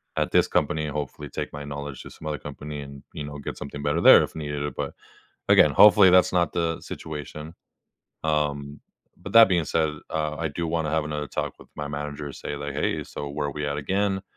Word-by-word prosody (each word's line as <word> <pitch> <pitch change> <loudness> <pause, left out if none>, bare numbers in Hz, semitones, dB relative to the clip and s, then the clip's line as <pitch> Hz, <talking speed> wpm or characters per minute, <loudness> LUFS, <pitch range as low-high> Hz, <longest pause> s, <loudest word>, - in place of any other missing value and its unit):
at - - 0
this - - +4
company, 75 0 0
hopefully, 75 -2 -5
take - - -5
my 75 0 -6
knowledge 70 -1 -6
to - - -10
some 80 - -10
other 75 -1 -2
company 75 +1 -7
and, 70 -1 -10
you 75 - -5
know, 75 0 -7
get 70 - -6
something 70 0 -7
better 75 +3 +1
there - - +9
if - - -7
needed. 75 -2 -3
But, - - -3 0.6
again, - - +7
hopefully, 95 -3 +8
that's 90 0 +5
not 85 -3 +2
the 85 -2 -1
situation. 75 +1 -7 0.7
Um, 75 -2 -1 0.4
but - - -9
that 115 -2 +9
being 85 -3 +2
said, 80 0 +1 0.2
uh, 75 -1 -2
I 80 - 0
do 85 +3 -4
wanna 80 -1 -1
have 80 0 +1
another 75 -1 -4
talk - - -4
with - - -15
my 75 0 -4
manager 75 0 -5
and 70 - -7
say, 75 - -5
like, 70 0 -5
"Hey. 75 - -1
So, 75 - -7
where 75 0 -2
are - - -4
we 75 +1 -4
at 70 0 -2
again? 95 +6 0
75 Hz, 215 wpm, -25 LUFS, 70-80 Hz, 0.7 s, there